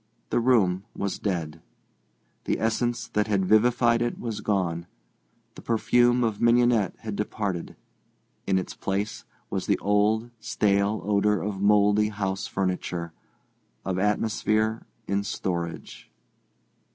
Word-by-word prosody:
The - - +2
room 105 -7 +3
was 100 -1 -3
dead. 80 -5 -3 0.8
The - - 0
essence 120 +1 0
that 105 0 0
had 100 -3 +1
vivified 115 +3 +3
it 120 0 -1
was 115 -3 -4
gone. 85 -5 -1 0.7
The - - -12
perfume 120 +2 +3
of 110 -3 -1
mignonette 120 -3 +3
had 110 -3 -5
departed. 100 -4 -3 0.7
In 95 - +3
its 95 - -3
place 100 +2 -3 0.3
was - - -2
the - - +3
old, 105 +3 +1
stale 100 0 +1
odour 105 0 +2
of 100 +2 -4
mouldy 105 +1 +4
house 95 -2 -3
furniture, 90 -3 -3 0.7
of 95 -1 -1
atmosphere 110 +2 0 0.2
in 100 0 0
storage. 85 -4 -4
105 Hz, 120 wpm, -26 LUFS, 95-110 Hz, 0.8 s, mouldy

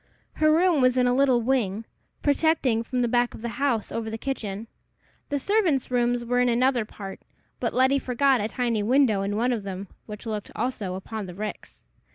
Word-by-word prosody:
Her 310 0 +4
room 335 -2 +4
was 255 0 +3
in 250 - +4
a 245 - +3
little 255 -3 +3
wing, 225 -4 0 0.4
projecting 285 -5 +2
from 250 +1 -1
the - - +2
back 240 +1 +1
of - - -12
the 235 - -2
house, 245 -6 0
over 225 -1 -3
the 220 - -4
kitchen. 220 -5 -4 0.6
The 285 - 0
servants' 330 - +1
rooms 240 -1 +1
were 245 +1 +1
in 250 0 +3
another 245 -1 +2
part, 195 -2 -9 0.4
but - - -1
Letty 260 +2 +3
forgot 260 -1 +2
a 210 - 0
tiny 235 -2 -1
window 230 -2 +3
in 200 +1 -2
one 245 +3 +2
of 225 - -2
them, 195 0 -6 0.2
which 210 +1 -8
looked 215 -2 -4
also 215 -6 -2
upon 205 +2 -6
the 180 - -9
ricks. 210 +2 -7
240 Hz, 200 wpm, -25 LUFS, 215-265 Hz, 0.6 s, Her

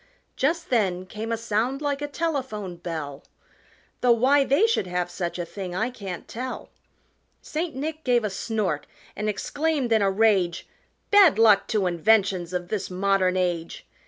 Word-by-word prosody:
Just 330 +4 -1
then 185 -6 +1
came 215 +4 -6
a 230 - 0
sound 230 +4 -1
like 290 -1 -2
a 290 - -2
telephone 265 - -3
bell 155 -5 -6 0.8
Though 245 - +3
why 270 +5 +4
they 280 +10 +3
should 450 - 0
have 180 0 -2
such 175 -2 -4
a 175 - -3
thing 180 0 -6
I 225 +6 -1
can't 195 -7 -7
tell 255 +3 -6 0.7
St. 315 -1 -3
Nick 310 +3 -4
gave 245 -2 +2
a 210 - -1
snort 195 -6 -2 0.3
and 215 0 -2
exclaimed 285 +4 -1
in 220 - +3
a 200 - +3
rage, 195 -4 +2 0.4
"Bad 400 - +7
luck 220 -3 +5
to 210 -3 0
inventions 185 0 +2
of 175 -1 -3
this 215 -3 -3
modern 185 0 +1
age!" 175 -2 -2
215 Hz, 160 wpm, -25 LUFS, 185-265 Hz, 0.8 s, Bad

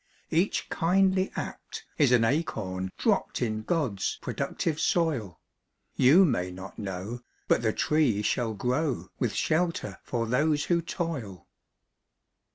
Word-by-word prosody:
Each 170 +5 +1
kindly 190 +2 +2
act - - -6
is 140 -4 +5
an 120 -2 +5
acorn 100 - -1
dropped - - +1
In 110 -3 -1
God's 115 - -1
productive 160 -2 -2
soil. 145 - 0 0.6
You 160 +10 +6
may 90 - 0
not 95 +2 -9
know, 100 +4 -5 0.3
but - - +3
the 110 -2 +2
tree 130 -7 +1
shall 110 0 0
grow, 130 +6 -1
With - - 0
shelter 170 +2 0
for 115 -2 -2
those 145 +5 +2
who 170 -1 +2
toil. 140 - -5
125 Hz, 125 wpm, -28 LUFS, 105-165 Hz, 0.6 s, You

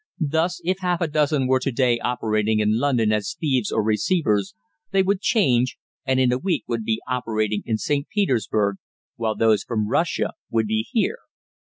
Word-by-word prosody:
Thus, 165 +3 0
if 185 +2 0
half 180 -2 0
a 170 - 0
dozen 150 -2 +1
were 130 0 +3
to 135 - -2
day 120 -1 +2
operating 110 -3 0
in 105 +1 +2
London 120 -6 +2
as 105 +8 -1
thieves 130 -8 0
or 110 - +1
receivers, 105 - +1 0.3
they 195 0 +3
would 195 +1 0
change, 130 - +2 0.3
and 130 0 +2
in 130 -1 +3
a 125 - 0
week 175 -2 -1
would 115 -1 -2
be 110 0 -1
operating 110 -4 -1
in 110 - 0
St. 140 +4 -1
Petersburg, 110 - 0 0.4
while 110 -2 -1
those 110 -1 +3
from 110 -3 -2
Russia - - 0 0.2
would 115 -1 +1
be 110 +1 -1
here. 345 - 0
125 Hz, 180 wpm, -23 LUFS, 110-150 Hz, 0.4 s, were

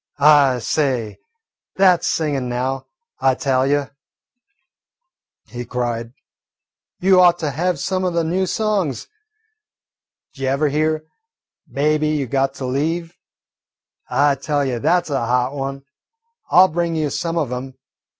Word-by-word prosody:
"I 145 -3 +5
say, 125 -3 -1 0.6
that 185 -3 +4
's - - 0
singin' 140 -6 -1
now, 130 +2 -3 0.3
I 130 -1 +3
tell 130 -1 +1
you," 145 0 0 1.5
he 120 +2 -7
cried. 120 -1 -3 0.9
"You 185 0 +5
ought 175 -1 +5
to 155 -4 -2
have 175 +5 -1
some 185 -1 -1
o' - - +2
the 170 -1 0
new 185 +4 0
songs. 195 - -1 1.3
D' - - -18
jever 135 +3 +1
hear 155 +1 0 0.7
'Baby, 150 +2 +1
you 150 -2 0
got 135 +2 0
to 135 - -5
leave'? 165 +6 -2 0.9
I 145 0 +3
tell 145 +1 -1
you, 125 -3 -2
that 175 +9 +2
's - - -8
a 135 -4 0
hot 125 +2 0
one. 135 -1 -5 0.7
I 180 - +7
'll - - +5
bring 170 +1 -1
you 155 -3 -1
some 170 0 -2
of 145 -7 -1
'em. 130 +1 -6
145 Hz, 140 wpm, -20 LUFS, 130-165 Hz, 1.5 s, I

